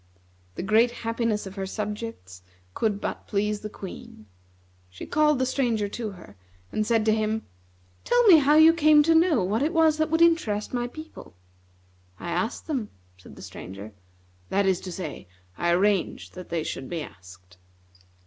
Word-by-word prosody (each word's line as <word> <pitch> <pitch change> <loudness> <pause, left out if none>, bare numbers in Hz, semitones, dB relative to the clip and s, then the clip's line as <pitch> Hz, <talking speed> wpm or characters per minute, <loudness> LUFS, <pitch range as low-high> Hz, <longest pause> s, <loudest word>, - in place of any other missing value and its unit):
The - - -4
great 220 +4 +4 0.2
happiness 230 -2 -1
of 190 - -8
her 195 -1 -4
subjects 210 - -6 0.3
could 210 - -1
but - - -5
please 210 0 -1
the 210 - -7
Queen. 185 - -10 0.6
She 90 - -9
called 300 -1 +2
the 260 - +1
Stranger 240 -5 0
to 220 +1 -4
her, 170 - -14 0.4
and 215 0 -1
said 225 -2 +2
to 215 - +4
him: 220 0 -1 0.6
"Tell 485 0 +3
me 370 -6 +9
how 295 0 +4
you 320 +1 +8
came 305 -2 +5
to 325 +2 +3
know 320 - +4
what 210 +6 0
it 310 +4 0
was 320 -2 +4
that 315 0 0
would 325 +1 +3
interest 245 -13 +1
my 240 -1 -1
people." 310 - -11 0.8
"I 170 - -5
asked 185 +8 -2
them," 260 -9 -3 0.3
said - - -14
the - - -12
Stranger. 100 +3 -9 0.6
"That 200 +1 +1
is 190 -2 +1
to 185 - -7
say, 170 - -7 0.3
I 175 - -1
arranged 190 +2 +1
that 180 -1 -10
they 170 -2 -1
should 130 - -5
be 165 -3 -3
asked." 90 -3 -15
215 Hz, 175 wpm, -25 LUFS, 185-290 Hz, 0.8 s, me